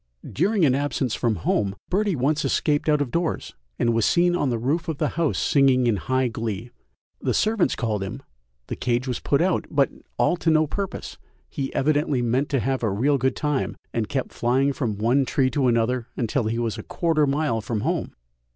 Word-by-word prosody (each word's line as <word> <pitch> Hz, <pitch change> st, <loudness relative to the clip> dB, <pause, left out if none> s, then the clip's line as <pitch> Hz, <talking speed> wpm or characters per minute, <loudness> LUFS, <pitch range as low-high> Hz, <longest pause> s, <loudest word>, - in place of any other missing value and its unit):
During 195 Hz, -, +2 dB
an 130 Hz, -, +4 dB
absence 135 Hz, -3 st, -1 dB
from 115 Hz, -3 st, 0 dB
home, 95 Hz, +2 st, 0 dB, 0.2 s
Birdie 200 Hz, 0 st, +1 dB
once 145 Hz, +3 st, +1 dB
escaped 150 Hz, +1 st, +1 dB
out 150 Hz, -1 st, +3 dB
of 135 Hz, -4 st, -2 dB
doors, 170 Hz, -1 st, -2 dB, 0.2 s
and 115 Hz, -1 st, +2 dB
was 115 Hz, -1 st, +1 dB
seen 175 Hz, -, +3 dB
on 145 Hz, -6 st, 0 dB
the 120 Hz, -, 0 dB
roof 145 Hz, +8 st, -1 dB
of 160 Hz, -3 st, -2 dB
the -, -, 0 dB
house 165 Hz, -3 st, 0 dB
singing 135 Hz, -3 st, +3 dB
in 115 Hz, -4 st, +2 dB
high 130 Hz, +5 st, 0 dB
glee; 115 Hz, 0 st, -4 dB, 0.5 s
the -, -, 0 dB
servants 215 Hz, -3 st, +2 dB
called 110 Hz, -5 st, -2 dB
him, 120 Hz, +8 st, -5 dB, 0.4 s
the -, -, -5 dB
cage 125 Hz, +1 st, -1 dB
was 125 Hz, -, -2 dB
put 145 Hz, +3 st, +1 dB
out, 185 Hz, 0 st, +1 dB
but 140 Hz, -2 st, +2 dB, 0.3 s
all 180 Hz, -, +2 dB
to 165 Hz, -, 0 dB
no 155 Hz, 0 st, +4 dB
purpose, 195 Hz, +6 st, -5 dB, 0.3 s
he 135 Hz, -1 st, -4 dB
evidently 145 Hz, -3 st, +1 dB
meant 125 Hz, +4 st, 0 dB
to 135 Hz, -, +1 dB
have 130 Hz, +2 st, -1 dB
"a 110 Hz, -, +1 dB
real 135 Hz, +8 st, +1 dB
good 130 Hz, 0 st, +1 dB
time," 150 Hz, -2 st, -1 dB, 0.2 s
and 110 Hz, -3 st, -1 dB
kept 135 Hz, -3 st, -3 dB
flying 130 Hz, +4 st, +1 dB
from 115 Hz, -7 st, -2 dB
one 120 Hz, +6 st, +2 dB
tree 130 Hz, 0 st, +1 dB
to 140 Hz, -3 st, +1 dB
another 120 Hz, +1 st, +1 dB
until 120 Hz, +1 st, 0 dB
he 115 Hz, +1 st, -1 dB
was 115 Hz, -3 st, -2 dB
a -, -, -4 dB
quarter 165 Hz, -3 st, 0 dB
of 145 Hz, -, +3 dB
a -, -, +2 dB
mile 140 Hz, -6 st, 0 dB
from 110 Hz, 0 st, -3 dB
home. 165 Hz, +6 st, -2 dB
135 Hz, 210 wpm, -24 LUFS, 120-150 Hz, 0.5 s, an